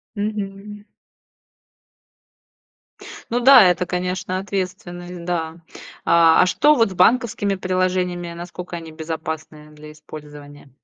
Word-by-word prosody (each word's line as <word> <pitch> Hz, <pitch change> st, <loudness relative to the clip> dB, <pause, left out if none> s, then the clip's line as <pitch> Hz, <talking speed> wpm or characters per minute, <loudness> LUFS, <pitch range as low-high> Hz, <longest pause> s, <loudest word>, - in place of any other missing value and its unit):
Мгм. 205 Hz, 0 st, -5 dB, 2.5 s
Ну 240 Hz, -, +1 dB
да, 260 Hz, -3 st, +9 dB
это, 180 Hz, +1 st, 0 dB
конечно, 185 Hz, +1 st, -3 dB
ответственность, 180 Hz, -2 st, -5 dB
да. 165 Hz, -2 st, -3 dB, 0.5 s
А, 165 Hz, 0 st, +5 dB
а -, -, +2 dB
что 295 Hz, +10 st, +3 dB
вот 225 Hz, -7 st, +2 dB
с -, -, -6 dB
банковскими 205 Hz, 0 st, +2 dB
приложениями, 185 Hz, -2 st, -1 dB
насколько 175 Hz, +1 st, -8 dB
они 165 Hz, -1 st, -9 dB
безопасны, 160 Hz, -1 st, -6 dB
э, -, -, -19 dB
для 150 Hz, 0 st, -13 dB
использования? 145 Hz, -2 st, -12 dB
180 Hz, 110 wpm, -21 LUFS, 160-195 Hz, 2.5 s, да